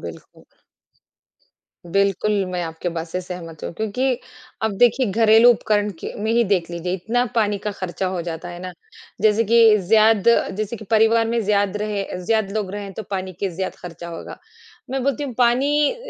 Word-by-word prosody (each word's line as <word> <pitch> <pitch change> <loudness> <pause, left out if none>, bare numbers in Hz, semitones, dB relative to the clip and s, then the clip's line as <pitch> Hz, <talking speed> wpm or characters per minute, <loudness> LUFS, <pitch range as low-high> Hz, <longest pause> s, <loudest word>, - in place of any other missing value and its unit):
बिल्कुल। - - -11 1.5
बिल्कुल, 200 +1 +1
मैं 180 -1 -2
आपकी 165 +2 -4
बात 165 0 -4
से 180 +3 -3
सहमत 175 -3 -9
हूँ - - -4
क्योंकि 240 +5 -1 0.4
अब 215 -3 -1
देखिए 245 +1 +4
घरेलू 225 +3 +6
उपकरण 210 -2 0
के - - -6
में 220 - 0
ही 235 0 +3
देख 175 -2 -2
लीजिए 170 +1 -4
इतना 230 +7 0
पानी 210 -3 +1
का - - +1
खर्चा 185 -1 -4
हो 185 -2 -2
जाता 170 +1 -6
है 175 - -8
ना, 185 - -6 0.5
जैसे 215 +1 +4
कि 225 -1 +6
ज़्याद 215 +3 +4 0.3
जैसे 215 +2 -3
कि 215 - -10
परिवार 225 +1 +4
में 235 0 0
ज़्याद 205 -1 +1
रहे 210 -1 -2 0.2
ज़्याद 220 -1 +1
लोग 210 -3 -2
रहें 200 -1 -6
तो 220 - -6
पानी 190 -1 -3
के 200 - 0
ज़्याद 190 -1 -3
खर्चा 170 -1 -8
होगा। 165 -1 -8 0.5
मैं 265 0 -2
बोलती 280 +2 -1
हूँ 265 - -5
पानी 270 +5 +3
अ, - - -10
210 Hz, 185 wpm, -21 LUFS, 185-225 Hz, 1.5 s, घरेलू